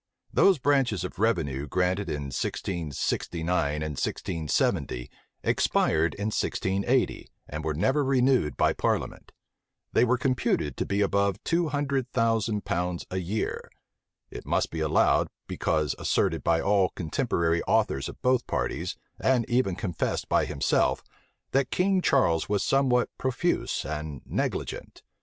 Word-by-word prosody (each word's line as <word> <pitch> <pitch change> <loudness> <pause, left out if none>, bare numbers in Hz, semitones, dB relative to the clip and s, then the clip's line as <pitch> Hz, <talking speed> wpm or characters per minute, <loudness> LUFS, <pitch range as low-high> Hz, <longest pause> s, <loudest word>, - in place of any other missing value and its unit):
Those 195 -3 +5
branches 130 - +1
of 90 - -6
revenue 75 -11 0
granted 95 +5 0
in 70 -2 -4
1669 80 -1 -2
and 80 - -3
1670, 75 -6 -1 0.3
expired 80 +2 +2
in 105 +2 -2
1680, 100 +7 0 0.2
and 75 +1 -5
were 75 -1 -1
never 135 - +2
renewed 130 - +2
by - - +3
parliament: - - -2 0.6
they - - +4
were 125 +1 +3
computed 120 - 0
to - - -2
be 100 +1 0
above 100 -1 +2
two 170 0 +1
hundred 140 -3 -1
thousand 115 -3 +1
pounds 90 0 -2
a 95 - -2
year. 95 +5 -3 0.6
It - - -7
must - - 0
be 80 - -4
allowed, 80 -1 +3 0.2
because 75 -3 0
asserted - - +1
by 80 0 +2
all 100 -2 +3
contemporary 85 - 0
authors 70 - +1
of - - -11
both 125 -1 +2
parties, - - -2 0.2
and 125 -3 +2
even 120 -7 +1
confessed 90 -6 -2
by - - +2
himself, - - +1 0.5
that 135 0 +2
King 190 0 +2
Charles 100 - +2
was 100 -1 +1
somewhat 130 -3 +2
profuse 130 +7 -1
and 75 -3 -5
negligent. - - -3
100 Hz, 135 wpm, -27 LUFS, 80-130 Hz, 0.6 s, Those